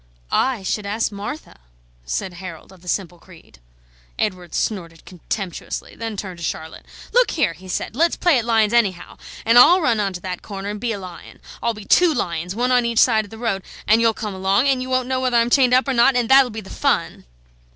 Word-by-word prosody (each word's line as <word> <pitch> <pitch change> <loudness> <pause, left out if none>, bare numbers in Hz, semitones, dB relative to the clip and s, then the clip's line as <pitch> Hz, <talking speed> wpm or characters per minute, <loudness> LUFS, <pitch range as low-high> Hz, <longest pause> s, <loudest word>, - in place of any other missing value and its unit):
"I 255 -6 +1
should 200 +2 -2
ask 220 +2 -1
Martha," 210 - -7 0.5
said 185 - -3
Harold 175 -2 -10
of 190 -2 -17
the 180 - -17
simple 175 -2 -3
creed. 165 - -18 0.6
Edward 180 -4 -3
snorted 170 -6 -3
contemptuously, 185 0 -6
then 225 -2 -5
turned 185 -3 -6
to - - -8
Charlotte. 160 0 -6 0.3
"Look - - +4
here," 185 - 0
he 185 +4 -14
said; 185 - -4
"let's 335 +5 +2
play 340 -8 +3
at 230 - -4
lions, 225 -2 +2
anyhow, 200 -7 0 0.3
and 230 +2 +6
I'll 350 +9 +7
run 245 -10 +1
on 200 -2 -1
to 180 - -7
that 180 -1 -5
corner 200 -1 -6
and 210 0 -6
be 240 - -1
a 215 - -3
lion, 185 -3 -11 0.2
I'll 235 -1 0
be 210 -1 -10
two 345 - +4
lions, 170 +2 -3
one 250 +2 0
on 250 -1 +4
each 235 -1 -2
side 220 -3 +4
of - - -15
the 225 - -11
road, 220 -4 -2 0.2
and 220 +2 +4
you'll 225 -1 +3
come 210 -2 -5
along, 195 +7 +1
and 265 -2 +2
you 255 - -5
won't 255 -1 0
know 260 0 -1
whether 255 -2 +2
I'm 235 +1 +2
chained 250 -2 +5
up 255 - +2
or 270 - +1
not, 245 +2 +4
and 245 -2 +1
that'll 265 -1 +6
be 220 -1 -6
the 190 - -13
fun!" - - -1
215 Hz, 225 wpm, -21 LUFS, 185-245 Hz, 0.6 s, I'll